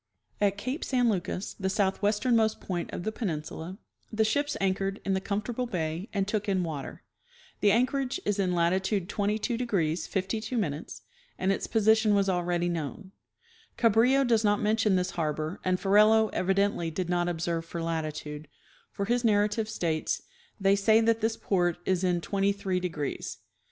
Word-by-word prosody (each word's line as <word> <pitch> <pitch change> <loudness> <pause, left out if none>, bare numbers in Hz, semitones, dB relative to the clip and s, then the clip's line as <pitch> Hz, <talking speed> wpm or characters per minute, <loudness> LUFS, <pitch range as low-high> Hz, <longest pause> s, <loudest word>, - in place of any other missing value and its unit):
At 200 -1 +2
cape 255 - -3
San 245 -3 +2
Lucas, 185 0 -3
the 190 - -1
southwesternmost 210 +3 +1
point 175 -3 -4
of - - -5
the 220 - -1
penin 170 -10 -3
sula, 175 +5 -7 0.3
the 220 0 +2
ships 285 +7 0
anchored 195 +1 0
in 195 - +1
the 190 - 0
comfortable 215 +5 -2
bay 170 -1 -3
and 195 -1 -1
took 210 0 -1
in 190 -2 +1
water. 155 -5 -6 0.6
The 205 - +4
anchorage 255 +4 +1
is 205 0 0
in 180 -2 +1
latitude 185 +2 +1
22° 205 -6 -1
52' 220 +4 -1 0.7
and 190 +1 +1
its 195 - -2
position 220 -1 +3
was 200 -1 +2
already 175 -1 0
known. 170 +3 -4 0.7
Cabrillo 240 +4 +4
does 230 -2 +3
not 205 -1 +3
mention 215 -1 +2
this 180 0 0
harbor, 155 +1 -2
and 185 0 +1
Ferrelo 215 +2 +5
evidently 195 -2 +1
did 175 +2 -3
not 175 0 +1
observe 170 -1 -2
for 170 +1 -6
latitude, 155 -2 -4 0.4
for 200 - -3
his 240 +3 +1
narrative 210 0 +2
states, 165 -7 -1 0.2
" 475 - -33
they 195 0 +4
say 215 +2 +4
that 225 0 +2
this 225 +1 0
port 175 -3 +1
is 185 -1 +1
in 175 -2 +1
twenty 200 +2 +1
three 195 -2 -2
degrees." 165 -6 -4
195 Hz, 160 wpm, -28 LUFS, 175-220 Hz, 0.7 s, Ferrelo